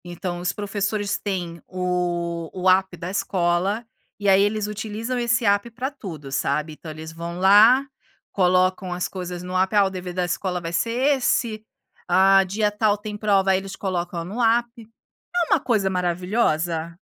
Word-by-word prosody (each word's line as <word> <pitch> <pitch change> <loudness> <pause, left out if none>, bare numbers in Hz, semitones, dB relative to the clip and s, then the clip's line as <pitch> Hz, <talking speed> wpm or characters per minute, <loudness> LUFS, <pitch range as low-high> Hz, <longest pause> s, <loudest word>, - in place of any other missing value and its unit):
Então 175 0 -5
os 180 0 -1
professores 205 0 -2
têm 175 -4 -4
o 175 -2 -2
o 185 0 +1
app 190 -1 +3
da 175 +2 -5
escola, 190 +3 0 0.3
e 205 - -2
aí 195 0 +6
eles 205 +1 0
utilizam 220 +4 -4
esse 240 0 +1
app 200 +3 +2
para 255 +3 -3
tudo 165 - -9
sabe, 150 +3 -1
então 160 +1 -11
eles 160 +1 -8
vão 170 +1 -6
lá, 215 +8 +6 0.5
colocam 185 0 +2
as 175 0 -2
coisas 180 -1 -6
no 180 +1 -6
app, 190 +3 +1
ah, 205 -1 +6
o - - 0
dever 185 -1 -6
da 180 0 0
escola 180 +1 -2
vai 165 -1 -6
ser 210 +6 0 0.3
esse, 230 -4 0 0.4
ah, 195 +2 +5
dia 205 +3 0
tal 210 0 +1
tem 210 0 -7
prova, 200 -2 +2
aí 190 - +3
eles 195 0 -8
colocam 175 -3 -3
no 210 +8 -4
app. 235 +1 +3 0.7
É 345 -2 +2
uma - - +4
coisa 215 -7 +1
maravilhosa. 175 -3 -1
190 Hz, 170 wpm, -23 LUFS, 175-210 Hz, 0.7 s, aí